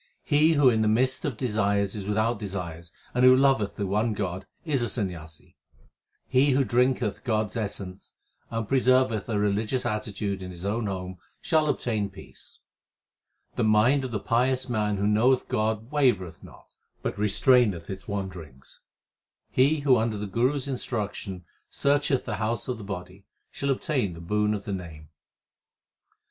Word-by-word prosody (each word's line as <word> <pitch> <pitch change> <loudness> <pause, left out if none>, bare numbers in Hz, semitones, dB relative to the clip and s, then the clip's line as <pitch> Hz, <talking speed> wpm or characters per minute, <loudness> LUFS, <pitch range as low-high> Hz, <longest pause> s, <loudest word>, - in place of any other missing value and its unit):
He 155 +3 +4
who 145 -3 +4
in 110 -3 +4
the 110 - +2
midst 130 +4 +1
of 135 -7 -2
desires 100 -4 0
is 100 -3 -4
without 110 +2 0
desires, 85 -5 -6 0.2
and 125 - +1
who 130 0 +8
loveth 130 -7 +2
the 100 - -2
one 105 +4 0
God 95 -2 -4 0.2
is 145 -6 0
a 120 - 0
Sanyasi. 85 -9 -5 0.7
He 135 +2 +3
who 135 +1 +3
drinketh 125 -3 +1
God 110 -4 0
s - - -16
essence 100 -3 -5 0.4
and 115 -2 -3
preserveth 130 -4 +2
a 110 - 0
religious 105 +5 0
attitude 105 -3 -3
in 90 - -6
his 90 +1 -8
own 110 +2 -1
home 95 -1 -5 0.2
shall 155 -2 +2
obtain 110 -7 -1
peace. 95 0 -12 1.0
The - - +1
mind 110 +6 +4
of 130 - -3
the 110 -3 -2
pious 125 +4 +1
man 105 -4 0
who 100 - -1
knoweth 115 +5 +3
God 110 +2 -1
wavereth 120 - +1
not, - - -16 0.3
but - - -3
restraineth 105 -3 +3
its 95 -1 -7
wanderings. 95 -10 -7 0.7
He 145 +4 +3
who 135 -3 +4
under 110 -1 0
the 105 - -4
Guru 120 +8 +1
s 140 -1 -3
instruction 105 -8 -4 0.2
searcheth 140 -2 +1
the 105 -4 -3
house 110 +2 -2
of 125 -3 -3
the - - -8
body, 95 0 -7 0.3
shall 140 - -3
obtain 130 - 0
the - - -10
boon 105 +5 0
of 100 - -7
the 100 - -3
Name. 80 -5 -8
110 Hz, 165 wpm, -26 LUFS, 100-130 Hz, 1.0 s, who